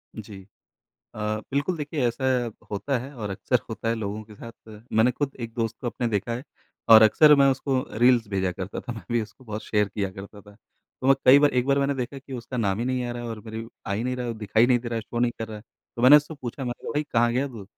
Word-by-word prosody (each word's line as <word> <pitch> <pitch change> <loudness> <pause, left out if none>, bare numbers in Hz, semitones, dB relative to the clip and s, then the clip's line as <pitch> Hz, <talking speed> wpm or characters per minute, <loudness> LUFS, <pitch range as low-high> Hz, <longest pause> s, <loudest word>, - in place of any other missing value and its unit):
जी। 105 -3 -9 0.7
अ, 105 0 -2
बिल्कुल 145 +6 0
देखिए 145 -3 -1
ऐसा 120 +3 -3 0.5
होता 125 +7 -1
है 135 +4 -9
और 110 -4 -5
अक्सर 115 +5 0
होता 115 0 -5
है 115 - +1
लोगों 105 0 -4
के 105 -1 -15
साथ, 115 - -10 0.4
मैंने 115 +3 +4
खुद 140 +2 -3
एक 115 -1 -6
दोस्त 115 -1 -2
को 125 - -3
अपने 120 0 -2
देखा 115 +1 -1
है। 125 - -6 0.5
और 110 -1 +10
अक्सर 150 +8 +7
मैं 140 0 +5
उसको 135 0 -1 0.2
रील्स 120 -2 +4
भेजा 95 -2 -1
करता 95 +2 -6
था - - -7
मैं 110 -5 -9
भी 120 -1 +2
उसको 110 +5 -11
बहुत 110 -2 -6
शेयर 105 -2 +1
किया 100 -1 -2
करता 100 +2 -11
था। 105 0 -17 0.5
तो 130 - -1
मैं 135 - +7
कई 135 +2 +9
बार 145 0 +5
एक 125 -1 +1
बार 140 0 +2
मैंने 140 0 +1
देखा 130 +2 -4
कि 135 0 -10
उसका 125 +1 -6
नाम 100 -3 0
ही 120 - -1
नहीं 130 -1 -1
आ 120 - -3
रहा 120 0 -6
है 120 - -5
और 110 -1 -6
मेरी 110 +1 -6 0.2
आ 100 - -1
ही 105 +3 -2
नहीं 125 0 -1
रहा 125 -1 -4
है 115 - -3
दिखाई 110 +2 +2
नहीं 125 -1 +3
दे 120 - -7
रहा 115 - -3
है, 115 - -2
शो 120 +2 -5
नहीं 120 0 +2
कर 115 - -4
रहा 110 - -7
है। 105 - -13 0.3
तो 120 - -4
मैंने 130 +4 +9
उससे 150 +2 -4
पूछा 125 +2 -5
मैंने 120 -1 -5
कहा - - -4
भई 150 +1 0
कहाँ 120 -4 +1
गया 135 +3 0
तू? 115 -6 -9
120 Hz, 275 wpm, -25 LUFS, 110-130 Hz, 0.7 s, और